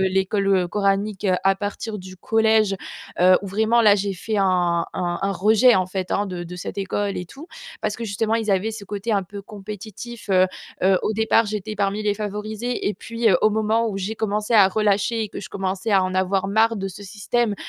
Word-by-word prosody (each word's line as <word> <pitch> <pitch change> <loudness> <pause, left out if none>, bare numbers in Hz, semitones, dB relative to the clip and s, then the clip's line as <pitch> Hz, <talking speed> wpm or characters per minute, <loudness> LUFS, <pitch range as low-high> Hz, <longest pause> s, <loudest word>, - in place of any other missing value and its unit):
l'école 190 -1 +1
coranique 200 +1 0 0.2
à 195 0 +3
partir 205 +1 -4
du 185 0 -10
collège, 220 -1 +2 0.4
heu, 185 0 +7
où - - -5
vraiment 220 +4 +2
là, 210 -2 +7
j'ai 200 0 -2
fait 215 +4 -3
un 175 -3 +2
un 175 -1 -2
un 195 0 +1
rejet 220 +6 +5
en 185 -1 +2
fait, 185 0 -4
hein, 205 - +1
de 180 -2 -5
de 180 +1 -8
cette 180 - -6
école 200 +1 -2
et 180 - -5
tout 295 - -12 0.3
parce 210 - -1
que, 230 - -5
justement, 220 +2 0
ils 220 -2 -1
avaient 200 +4 0
ce 215 -2 -8
côté 205 +3 -3
un 200 -2 +2
peu 200 +2 -9
compétitif. 210 +3 -9
Heu 185 -1 +5 0.4
heu, 190 -1 +4
au 220 - 0
départ 220 +1 +3
j'étais 215 0 -4
parmi 200 +1 0
les 205 -1 +1
favorisés. 215 +3 -3
Et 210 - -2
puis, 230 0 -1
heu, 180 - +5
au 215 - +5
moment 220 +2 +1
où 195 - -4
j'ai 200 +4 -3
commencé 210 +1 -2
à 195 -3 +7
relâcher 215 +2 +1
et - - -6
que - - -7
je - - -8
commençais 195 +3 -3
à 190 -1 +5
en 185 0 -3
avoir 190 +1 +1
marre 225 +2 +3
de 195 0 -3
ce 195 +2 -10
système, 210 +3 -1
205 Hz, 215 wpm, -22 LUFS, 190-220 Hz, 0.4 s, heu